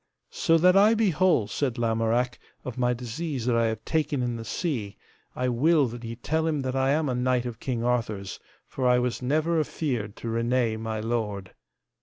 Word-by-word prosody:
So 165 - +3
that 180 +3 +5
I 210 +3 +6
be 220 -4 +2
whole, 175 - +3
said 130 +2 -2
Lamorak, 115 +2 0 0.3
of 125 - -5
my 125 -1 +1
disease 125 +2 -4
that 125 -2 +2
I 115 0 +3
have 110 -1 -4
taken 150 -4 0
in 120 -1 -1
the 115 - -6
sea, 115 - -3 0.4
I 125 - -1
will 145 +5 +3
that 120 +1 -8
ye 115 0 -5
tell 160 +6 -1
him 150 -3 0
that 130 0 -2
I 135 0 +2
am 150 +2 +2
a 130 - 0
knight 125 0 +1
of 120 -3 -6
King 120 -3 -2
Arthur's, 110 -5 -2 0.3
for 130 -2 -2
I 125 0 +5
was 125 0 -1
never 155 +6 +1
afeard 125 -9 -2
to - - -7
reneye 115 0 0
my 110 -1 -3
lord. 105 -4 -3
125 Hz, 200 wpm, -26 LUFS, 115-150 Hz, 0.4 s, I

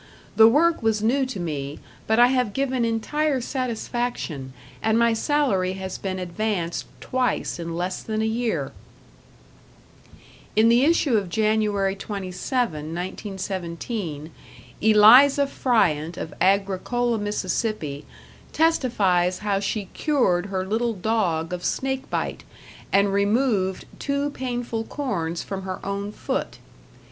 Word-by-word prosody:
The 220 0 +8
work 320 +7 +3
was 220 -2 +1
new 260 +4 +2
to 255 -7 -5
me, 145 -4 -4 0.3
but 220 - +2
I 245 +1 +7
have 250 -5 +1
given 260 -3 0
entire 270 +6 0
satisfaction, 240 - -3 0.3
and 220 0 +2
my 235 0 +4
salary 220 -8 +1
has 190 -1 -6
been 190 -1 -3
advanced 180 -1 -2
twice 255 -7 -1
in 165 0 -4
less 180 +2 -3
than 215 -1 -3
a 220 - +1
year." 225 +1 -1 1.8
In 220 +2 +5
the 240 +3 +5
issue 300 -7 +3
of 195 -4 -2
January 210 -1 +1
27, 200 +4 -2
1917, 175 0 -5 0.5
Eliza 240 +7 +7
Fryant 175 - +1
of 160 - -6
Agricola, 200 +5 +1
Miss., 205 -1 -1 0.9
testifies 200 - +2
how 205 -1 -1
she 200 +1 -2
cured 205 - +1
her 190 -1 -2
little 225 +4 0
dog 180 -5 -1
of 180 0 -4
snake 265 0 -2
bite - - -3 0.5
and 200 0 +3
removed 200 -2 +1
two 280 +1 -1
painful 245 -4 -3
corns 185 - -3
from 195 -1 -5
her 185 -1 -5
own 200 +1 -3
foot. - - -3
215 Hz, 120 wpm, -24 LUFS, 185-245 Hz, 1.8 s, The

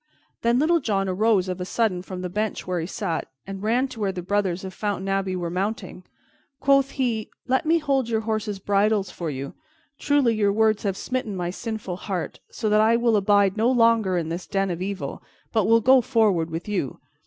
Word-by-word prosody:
Then 235 +1 +3
Little 330 +5 +3
John 195 -7 0
arose 195 0 +2
of 185 0 -4
a - - 0
sudden 190 -1 0
from 185 0 -7
the - - -1
bench 210 +3 -2
where 180 -1 -1
he 165 - -3
sat, 165 -3 -3 0.2
and 195 0 -7
ran 240 +5 +1
to 250 -3 -10
where 200 -2 0
the 180 -2 -6
brothers 190 -1 0
of 190 -1 -6
Fountain 200 -2 -3
Abbey 195 -1 0
were 175 -2 -3
mounting. 190 0 -3 0.6
Quoth 275 -1 +4
he, 235 -5 -1 0.2
"Let 260 +5 +1
me 330 +1 +5
hold 275 -6 0
your 220 -1 +1
horses' 215 -2 -2
bridles 200 0 +1
for 170 -2 -4
you. 140 -1 -5 0.5
Truly, 285 -5 +3
your 205 -2 +2
words 220 0 +2
have 195 -2 -2
smitten 250 -6 -3
my 175 -1 -2
sinful 215 -3 -5
heart, 185 -3 -4
so 220 - -3
that 210 0 +4
I 225 +2 +4
will 235 -1 +2
abide 200 0 +3
no 225 +3 +3
longer 230 -6 +3
in 165 -2 -2
this 170 +2 -5
den 195 -2 0
of 175 0 -4
evil, 195 0 -4 0.3
but 220 -4 +2
will 230 +1 +5
go 260 +3 +6
forward 215 -10 +2
with 165 +4 -5
you. 195 -10 -2
205 Hz, 210 wpm, -24 LUFS, 185-230 Hz, 0.6 s, go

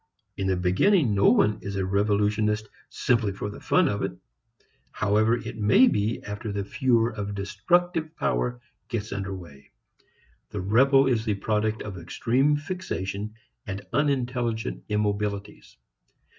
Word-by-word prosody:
In 95 - -2
the 95 - +2
beginning 105 - +3
no 100 0 +5
one 105 0 +3
is 100 0 -5
a 95 -1 -1
revolutionist 105 +2 +1 0.2
simply 115 -5 +1
for 105 +1 -5
the - - -10
fun - - +3
of - - -1
it, - - -1 0.8
however 110 +3 +2
it 110 - -7
may 105 - +6
be 105 - 0
after 105 +1 -5
the 100 0 -2
furor 120 +1 +2
of 105 -1 -4
destructive 155 - 0
power 125 -5 -1 0.3
gets 110 -2 -4
under 95 -1 -4
way. 75 -7 -12 0.8
The 105 - -4
rebel 135 +8 +4
is 120 -4 +1
the 110 -3 0
product 110 +2 -1
of 95 -4 -7
extreme 125 - +1
fixation 110 - -4 0.3
and 100 +1 -5
unintelligent 125 -5 -1
immobilities. 105 -1 -2
105 Hz, 140 wpm, -26 LUFS, 100-120 Hz, 0.8 s, may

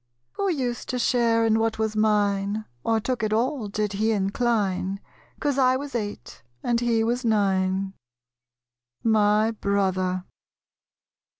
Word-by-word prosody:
Who 400 - -1
used 255 -8 -2
to 255 - -1
share 230 -2 +2
in 220 0 +3
what 225 0 0
was 220 -1 -1
mine, 210 -1 +1 0.2
Or 225 -1 +2
took 245 +1 -2
it 215 -1 -1
all, 240 +1 0
did 210 0 -2
he 215 +3 +1
incline, 200 -2 0 0.4
'Cause 285 -2 0
I 255 -1 +4
was 285 +1 -7
eight, 210 -3 -5 0.2
and 240 -1 +1
he 235 -2 +1
was 240 +3 0
nine? 195 -3 +1 1.1
My 215 0 +3
Brother. 190 -3 0
220 Hz, 130 wpm, -25 LUFS, 200-235 Hz, 1.1 s, I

